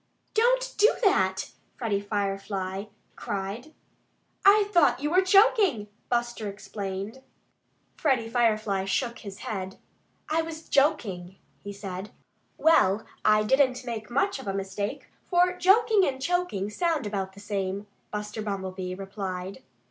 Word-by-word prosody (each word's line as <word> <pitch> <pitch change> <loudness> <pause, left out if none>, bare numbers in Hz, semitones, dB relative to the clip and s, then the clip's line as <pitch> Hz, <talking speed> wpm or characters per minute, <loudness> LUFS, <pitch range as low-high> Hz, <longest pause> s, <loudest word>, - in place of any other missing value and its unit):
"Don't - - +2
do 425 +3 +7
that!" 190 - +2 0.3
Freddie 210 -4 -1
Firefly 195 -1 -3 0.3
cried. 205 +8 -5 0.7
"I 405 +1 +6
thought 340 -9 +4
you 295 +2 -2
were 365 +2 +5
choking," 380 - +4 0.2
Buster, 240 -3 -1
explained. 200 +3 -6 0.8
Freddie 260 -7 +1
Firefly 215 -4 +1
shook 235 +4 -1
his 200 -2 -9
head. 190 -2 -4 0.5
"I 320 +1 +1
was 325 -1 -7
joking," 200 - +1 0.3
he 200 - -6
said. 195 0 -6 0.5
"Well, 220 -11 +4 0.2
I 215 0 +4
didn't 255 +1 +2
make 225 -3 -5
much 330 +7 0
of 265 - -9
a 195 - -1
mistake; 195 +1 -4 0.2
for 360 0 +4
joking 405 +3 +4
and 265 -1 -2
choking 330 - -1
sound 325 0 0
about 195 -2 -3
the 200 - -13
same," 200 -1 -3 0.3
Buster 210 +1 -4
Bumblebee 190 -3 -4
replied. 190 -1 -5
215 Hz, 125 wpm, -27 LUFS, 195-310 Hz, 0.8 s, do